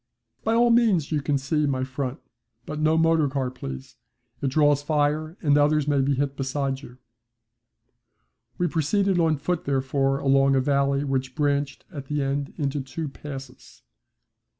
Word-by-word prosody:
'By 225 +1 +1
all 240 0 +4
means 215 -11 +3
you 150 -2 +1
can 140 0 0
see 150 +2 0
my 130 -2 -1
front. 130 +1 -4 0.5
But 150 - -5
no 155 +1 +3
motorcar, 145 -5 +2
please. 130 -1 -8 0.4
It 140 - 0
draws 145 +1 +3
fire 150 +2 0
and 145 -2 +4
others 150 0 +2
may 145 -2 +2
be 140 +1 +1
hit 140 +1 -1
beside 135 0 -2
you.' 125 -3 -13 1.6
We 175 - +1
proceeded 180 +4 +1
on 160 -2 +2
foot 170 +4 -2
therefore 135 0 0
along 135 0 +3
a - - +4
valley 140 0 +1
which 130 -2 -2
branched 145 -1 -1
at 140 -5 -8
the 150 0 -1
end 140 +1 -2
into 140 -1 -1
two 145 +4 -5
passes. 135 -1 -10
140 Hz, 155 wpm, -25 LUFS, 135-155 Hz, 1.6 s, all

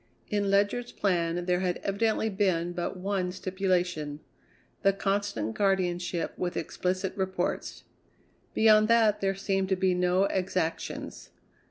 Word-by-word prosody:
In 205 -1 +1
Ledyard's 205 +5 +1
plan 175 -2 0
there 180 0 +1
had 180 -1 -1
evidently 220 +2 +1
been 190 -5 0
but 175 +1 -3
one 185 -1 -1
stipulation: 180 -5 -1 0.6
the 195 -2 +4
constant 195 - -1
guardianship 180 -3 0
with 180 -1 -2
explicit 185 +3 -2
reports. 190 -2 -2 0.7
Beyond 215 -1 +6
that 225 -2 +4
there 195 0 +1
seemed 195 0 -1
to 190 - +3
be 185 0 +2
no 180 +1 +2
exactions. 185 -4 -2
190 Hz, 125 wpm, -28 LUFS, 180-200 Hz, 0.7 s, Beyond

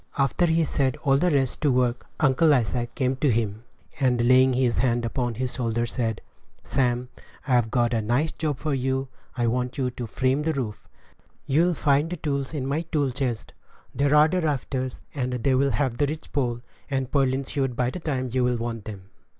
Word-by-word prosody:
After 140 +5 +2
he 165 0 +3
had 160 - +1
set 130 -3 0
all 135 -1 +4
the 180 +5 +2
rest 135 -5 0
to 150 -3 +3
work, 125 -1 0
Uncle 150 +2 +4
Isaac 120 0 -1
came 130 -1 0
to 145 +1 +2
him, 110 -2 -1 0.4
and 125 -3 +2
laying 130 +1 +5
his 125 -3 +1
hand 120 -1 +1
upon 120 0 -2
his 125 +2 -3
shoulder, 120 -1 -1
said, 115 -2 -2 0.4
"Sam, 125 -1 0 0.4
I've 120 -4 +3
got 120 0 +1
a 115 - +1
nice 125 +9 +1
job 150 -4 -2
for 155 +1 -2
you; 130 0 -1 0.3
I 120 - +1
want 125 +3 -1
you 130 -2 0
to 120 -1 -6
frame 130 +5 0
the 160 +1 0
roof; 115 -7 -5 0.6
you'll 165 +5 +2
find 150 +5 +1
tools 140 -3 -1
in 135 -3 -2
my 140 +4 0
tool 150 -5 -1
chest. 125 -3 -3 0.4
There 140 +1 +2
are 150 +1 +7
the 180 +2 0
rafters, 130 -4 -2
and 125 -3 -2
they 125 +2 +1
will 135 +2 +3
have 135 -4 -1
the 145 - +3
ridge 155 +2 -6
pole 120 -4 -1 0.3
and 135 -2 -2
purlins 135 -1 +1
hewed 135 -3 -1
by 125 0 0
the 180 - -6
time 130 -6 -2
you 130 +1 +1
will 125 -1 +1
want 115 -2 -4
them." 105 -3 -7
130 Hz, 200 wpm, -25 LUFS, 120-140 Hz, 0.6 s, are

